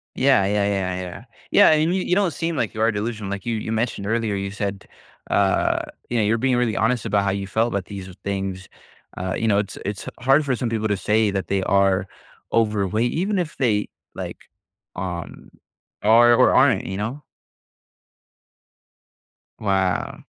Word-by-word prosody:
Yeah. 130 Hz, -7 st, +4 dB
Yeah, 100 Hz, +1 st, +1 dB
yeah, 95 Hz, -2 st, -1 dB
yeah. 90 Hz, -1 st, -8 dB, 0.3 s
Yeah, -, -, +7 dB
and 155 Hz, +3 st, +2 dB
you 190 Hz, -, 0 dB
you 180 Hz, -, +1 dB
don't 195 Hz, -3 st, +2 dB
seem 165 Hz, +2 st, -3 dB
like 115 Hz, -6 st, -1 dB
you 110 Hz, -, -4 dB
are 115 Hz, +1 st, +4 dB
delusional, 105 Hz, -1 st, -4 dB
like, 100 Hz, -1 st, -5 dB
you 115 Hz, -1 st, -1 dB
you 110 Hz, 0 st, -4 dB
mentioned 110 Hz, -3 st, -2 dB
earlier, 115 Hz, -1 st, 0 dB
you 100 Hz, 0 st, -3 dB
said, 100 Hz, -1 st, -4 dB, 0.4 s
uh, 100 Hz, -1 st, +2 dB, 0.3 s
you 120 Hz, -, -1 dB
know, 110 Hz, -, +3 dB
you're 110 Hz, +3 st, +2 dB
being 130 Hz, +1 st, +1 dB
really 120 Hz, -4 st, +1 dB
honest 115 Hz, +4 st, +1 dB
about 100 Hz, -2 st, +1 dB
how 100 Hz, -, +1 dB
you 100 Hz, 0 st, -3 dB
felt 110 Hz, +3 st, +1 dB
about 100 Hz, -2 st, -2 dB
these 95 Hz, -2 st, -8 dB, 0.2 s
things. 95 Hz, -1 st, -3 dB, 0.5 s
Uh, 90 Hz, 0 st, -2 dB
you 115 Hz, -, -1 dB
know, 100 Hz, -2 st, +3 dB
it's 100 Hz, -1 st, -4 dB
it's 100 Hz, 0 st, -4 dB
hard 135 Hz, +4 st, +3 dB
for 130 Hz, -2 st, +1 dB
some 120 Hz, 0 st, -2 dB
people 110 Hz, -1 st, -1 dB
to 105 Hz, -2 st, 0 dB
say 105 Hz, +3 st, +2 dB
that 95 Hz, -2 st, -3 dB
they 100 Hz, -1 st, 0 dB
are 95 Hz, 0 st, +2 dB, 0.5 s
overweight 110 Hz, +1 st, +1 dB
even 195 Hz, +4 st, -1 dB
if 170 Hz, -4 st, -4 dB
they, 110 Hz, -6 st, +1 dB, 0.3 s
like, -, -, -6 dB, 0.6 s
um, 90 Hz, -2 st, -6 dB, 0.5 s
are 115 Hz, +3 st, +6 dB
or 125 Hz, -, +5 dB
aren't, 120 Hz, -9 st, +4 dB
you 95 Hz, 0 st, -4 dB
know? 120 Hz, +8 st, -4 dB, 2.4 s
Wow. 95 Hz, -3 st, -1 dB
105 Hz, 180 wpm, -22 LUFS, 100-120 Hz, 2.4 s, Yeah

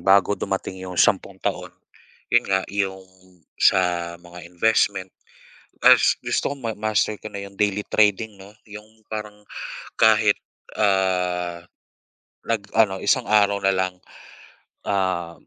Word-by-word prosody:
bago 100 Hz, +1 st, +4 dB
dumating 95 Hz, -2 st, -4 dB
'yong 90 Hz, -1 st, -7 dB
sampung -, -, +2 dB
taon, -, -, -2 dB, 0.6 s
'yon -, -, +4 dB
nga, 95 Hz, -1 st, +1 dB
'yong 95 Hz, -1 st, -2 dB, 0.6 s
sa 85 Hz, -1 st, +2 dB
mga 85 Hz, 0 st, -12 dB
investment 95 Hz, 0 st, +1 dB, 0.8 s
is -, -, +6 dB
gusto -, -, -1 dB
kong 140 Hz, -4 st, -6 dB
mamaster 110 Hz, 0 st, 0 dB
ko 110 Hz, -, -7 dB
na, 100 Hz, -, -7 dB
'yong 100 Hz, -, -14 dB
daily 105 Hz, 0 st, 0 dB
trading, 105 Hz, +1 st, +2 dB
'no? 95 Hz, 0 st, -14 dB, 0.2 s
'Yong 105 Hz, +1 st, -13 dB
parang 105 Hz, -1 st, -7 dB, 0.5 s
kahit, 110 Hz, -2 st, +4 dB, 0.4 s
ah, 90 Hz, -3 st, 0 dB, 0.9 s
nag-ano, 110 Hz, -2 st, +1 dB
isang 125 Hz, -, +2 dB
araw 100 Hz, -1 st, +3 dB
na 95 Hz, 0 st, +2 dB
lang, 95 Hz, -1 st, -1 dB, 0.9 s
ah 95 Hz, -4 st, -1 dB
100 Hz, 120 wpm, -23 LUFS, 95-105 Hz, 0.9 s, is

